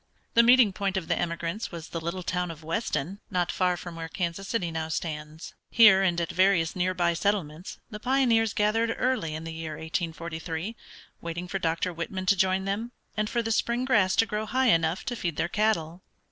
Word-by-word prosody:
The 230 - +7
meeting 235 -3 +6
point 195 0 -1
of 185 - -3
the - - +2
emigrants 170 +4 -3
was 170 -1 -8
the 165 - -4
little 170 +3 -4
town 180 0 -1
of 165 -1 -9
Weston, 165 +1 -2
not 180 -3 0
far 180 -1 +1
from 175 0 -8
where 165 0 -6
Kansas 180 +2 -3
City 185 -7 -1
now 160 -1 -3
stands. 155 0 -5 0.2
Here 215 -5 +7
and 175 -3 +2
at 170 - -2
various 185 -3 +3
near 185 0 0
by 175 -1 +2
settlements 175 -3 -2
the 210 - -6
pioneers 235 -3 +2
gathered 225 +2 +1
early 245 -12 0
in 160 - -6
the 165 0 -6
year 160 -1 -5
1843, 165 +4 -4 0.5
waiting 170 +1 -5
for 195 +2 -3
Dr. 165 +1 -1
Whitman 185 +3 -4
to 200 +1 +4
join 190 0 +1
them, 220 +5 -3 0.2
and 215 0 -1
for 235 - 0
the 225 - -2
spring 235 +3 +1
grass 205 -7 +3
to 225 - +4
grow 215 0 -3
high 260 +1 +2
enough 165 -1 +2
to 245 - -2
feed 175 -8 -3
their 170 - 0
cattle. 180 -4 0
180 Hz, 200 wpm, -27 LUFS, 165-210 Hz, 0.5 s, The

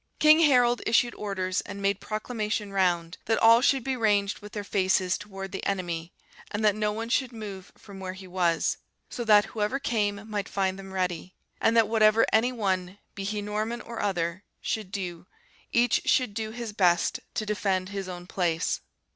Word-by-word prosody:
King 310 +1 +7
Harold 245 -6 +4
issued 235 +1 +3
orders 190 -2 -2
and 200 0 -8
made 200 0 0
proclamation 215 -1 -3
round, 175 -3 +1
that 225 - +2
all 230 +1 +6
should 270 -1 +3
be 265 +1 -1
ranged 205 -4 +1
with 210 0 -12
their 205 - -4
faces 190 -2 +1
towards 195 0 -7
the 195 - -5
enemy; 175 -4 -2 0.4
and 210 +1 -2
that 210 - +5
no 210 0 0
one 225 +2 -4
should 255 +1 0
move 205 -5 -8
from 200 -2 -12
where 185 -1 -5
he 190 0 -11
was; 175 -2 +1 0.3
so 245 - -3
that, 210 -2 +6
whoever 215 +4 0
came, 210 -5 -1
might 205 -2 -3
find 190 -1 -1
them 195 0 -9
ready; 185 -1 -3 0.3
and 230 +1 +3
that 225 -2 +5
whatever 220 0 +4
any 230 +3 +4
one, 190 -5 -2 0.2
be 195 - -6
he 205 +1 -2
Norman 215 +3 -2
or 235 -1 -6
other, 180 -2 -1 0.2
should 215 -4 -3
do, 180 -3 -5 0.4
each 240 0 +3
should 250 -5 +2
do 220 +1 -3
his 230 -1 -6
best 175 -4 +2 0.2
to 215 - -1
defend 195 -3 -1
his 195 -2 -5
own 175 -1 -7
place. 175 -3 0
205 Hz, 185 wpm, -27 LUFS, 185-225 Hz, 0.4 s, King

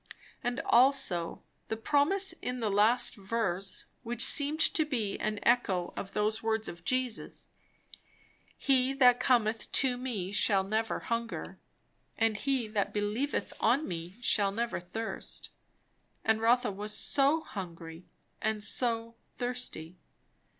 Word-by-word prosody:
And 245 +1 -1
also 235 -10 +3 0.2
the 220 - -3
promise 305 - +2
in 250 0 -3
the 220 -3 -1
last 215 +5 +3
verse, 195 -3 -2 0.2
which 240 -1 -2
seemed 290 +2 +3
to 320 0 +4
be 235 -10 -2
an 215 -1 -2
echo 195 -7 +1
of 195 - -6
those 215 +1 0
words 220 0 -1
of 170 -1 -9
Jesus 255 +1 -2 1.1
"He 265 -1 +2
that 250 -3 +5
cometh 225 -3 +1
to 255 -2 +3
me 215 -8 -4
shall 200 -1 +2
never 220 +3 -2
hunger, 230 0 -4 0.6
and 225 -1 +2
he 260 +1 -1
that 205 -1 -1
believeth 210 +4 -2
on 255 +7 +2
me 170 +1 -6
shall 200 -4 +3
never 235 +3 -2
thirst." 220 +6 -6 0.7
And 220 0 +2
Rotha 240 0 +3
was 210 +2 -1
so 285 +3 +3
hungry, 170 - -8 0.3
and 215 -1 0
so 230 0 +1 0.2
thirsty! 245 -9 -4
225 Hz, 130 wpm, -30 LUFS, 205-250 Hz, 1.1 s, that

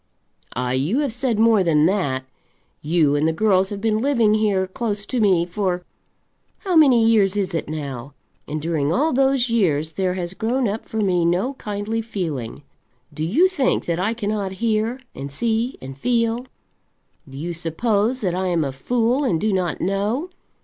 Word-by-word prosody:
"Ah, 125 0 -1
you 140 - 0
have 280 -6 -1
said 245 -2 0
more 220 -3 +4
than 155 -3 +3
that. 150 -9 0 0.6
You 155 -2 +2
and 150 +2 +2
the - - +2
girls 190 +1 +2
have 205 - -5
been 215 0 +1
living 235 -5 +3
here, 210 -3 +2
close 205 +1 -3
to 255 - -2
me, 185 -5 +3
for 180 -1 -2 0.8
how 370 -3 -1
many 260 -8 +6
years 210 -3 +3
is 195 -3 -1
it 165 - -3
now? 140 -3 -6 0.3
and 155 - -3
during 155 -2 -1
all 295 - +1
those 265 -2 +2
years 160 -9 +1
there 185 +1 -1
has 175 -1 -4
grown 240 +5 0
up 210 +2 -4
for 220 - -6
me 185 -5 +2
no 180 +10 +1
kindly 210 -1 -3
feeling. 160 - -5 0.5
Do 155 +1 -4
you 250 - +4
think 310 -9 0
that 170 0 -1
I 215 +5 0
cannot 205 -3 -2
hear, 225 +4 -1
and 140 +1 -7
see, 230 - -1
and 135 0 -7
feel? 235 - 0 0.8
Do 135 - -10
you 170 +4 -4
suppose 205 +9 0
that 185 -5 0
I 185 +1 -1
am 170 -3 +1
a 135 - -2
fool 240 - 0
and 200 - +1
do 215 +2 0
not 180 -4 -1
know? 210 - -1
200 Hz, 180 wpm, -22 LUFS, 165-230 Hz, 0.8 s, many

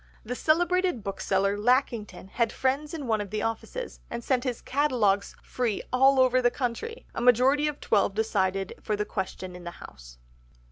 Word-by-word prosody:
The 240 - -3
celebrated 350 - +1
bookseller 195 0 0
Lackington 220 -5 0
had 230 +2 0
friends 285 +4 -1
in 295 -4 -5
one 220 -3 +1
of 205 - -6
the 215 +2 -2
offices, 225 - -4
and 235 0 -5
sent 255 -1 +1
his 250 -3 -2
catalogues 245 -8 +1
free 240 -5 -2
all 265 +1 +5
over 255 0 +4
the 245 - +4
country. 275 - -4
A - - -4
majority 255 +5 +4
of 300 -1 -3
twelve 200 -2 +1
decided 195 -3 0
for 215 - -1
the 210 0 -2
Question 185 -2 -5
in 180 - -10
the 175 - -5
House. - - -13
235 Hz, 175 wpm, -27 LUFS, 205-265 Hz, -, all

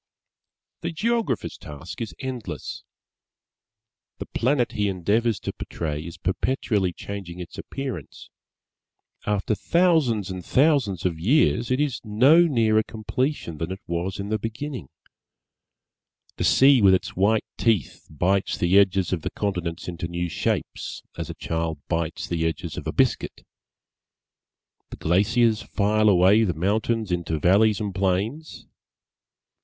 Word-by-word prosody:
The 170 - -3
Geographer's 230 +7 -1
task 75 - -9
is 115 - -5
endless. 120 - -6 1.3
The - - -6
Planet 125 0 0
he 105 -1 0
endeavours 105 +5 +1
to - - -4
portray 75 -3 -4
is 85 0 -9
perpetually 95 +2 0
changing 90 -1 -7
its 85 -5 -8
appearance. 130 - -7 1.0
After 105 +1 0
thousands 140 - +2
and 90 -1 -6
thousands 130 - +2
of 85 -3 -1
years, 120 - +2
it 130 +1 +1
is 145 -4 -1
no 135 +11 +5
nearer 110 -6 +3
completion 110 - -3
than 80 +2 -3
it 95 - -5
was 85 +3 -3
in 100 +1 -4
the 110 0 0
beginning. 120 +6 -5 1.5
The - - 0
Sea 135 -2 +6
with 95 -2 +7
its - - -4
white 105 +4 +2
teeth 110 - 0
bites 95 +6 0
the 90 +3 +4
edges 95 -2 +2
of 85 - -1
the - - -3
continents 90 -5 -3
into 85 -1 -4
new 85 0 -3
shapes, - - -3
as 85 -1 -5
a 85 - -6
child 80 -1 -2
bites 85 -1 -2
the 85 -2 -1
edges 80 - -4
of - - -6
a - - -1
biscuit. - - 0 1.4
The - - -9
glaciers 110 +6 +2
file 110 +1 +2
away 95 +3 +5
the 90 -6 0
mountains 110 +4 0
into 85 -2 -1
valleys 100 +6 +4
and 105 -3 -3
plains. 100 - -2
100 Hz, 135 wpm, -24 LUFS, 90-115 Hz, 1.5 s, with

